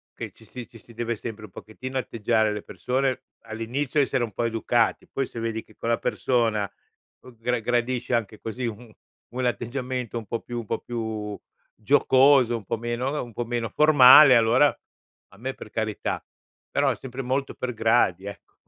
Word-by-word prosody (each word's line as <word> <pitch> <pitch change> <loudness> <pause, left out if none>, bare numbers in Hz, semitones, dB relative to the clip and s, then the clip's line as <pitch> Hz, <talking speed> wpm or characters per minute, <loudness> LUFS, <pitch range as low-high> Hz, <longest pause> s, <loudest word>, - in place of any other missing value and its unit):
che - - -6
ci - - -19
si 125 -2 -9
ci 115 - -14
si 115 +3 -17
deve 120 +1 -2
sempre 110 0 -7
un 95 - -16
pochettino 130 +7 -7
atteggiare 110 -2 +1
alle 105 -1 -3
persone 130 0 -2 0.2
all'inizio, 125 +6 -2
essere 135 -2 0
un 115 - -4
po' 120 - -2
educati, 115 0 0
poi 135 -2 -3
se 115 - -8
vedi 115 -1 -2
che 110 - -22
quella 115 0 0
persona, 110 -5 0 0.5
uhm, 125 -3 -15
gra 125 +1 0
gradisce 120 +2 -1
anche 110 -2 -2
così 120 +3 -5
u 115 +1 -8 0.4
un 130 -1 -1
atteggiamento 125 +1 -3
un 115 - -5
po' 115 - -3
più 120 -1 -5
un 115 - -7
po' - - -2
più 110 -3 -5 0.4
giocoso, 130 0 +4
un 105 - -11
po' 115 - -2
meno 120 +3 -2
uhm, 150 - -3
un 115 - -14
po' 120 - -3
meno 115 -2 -2
formale, 145 -1 +8
allora 120 +5 +5 0.7
a - - -17
me 130 +4 -4
per 110 - -11
carità. 110 -2 -2 0.5
Però - - +2
sempre 130 0 -7
molto 135 +2 -2
per 125 -1 -4
gradi, 110 -4 +2
ecco. 100 - -10
120 Hz, 185 wpm, -25 LUFS, 110-130 Hz, 0.7 s, formale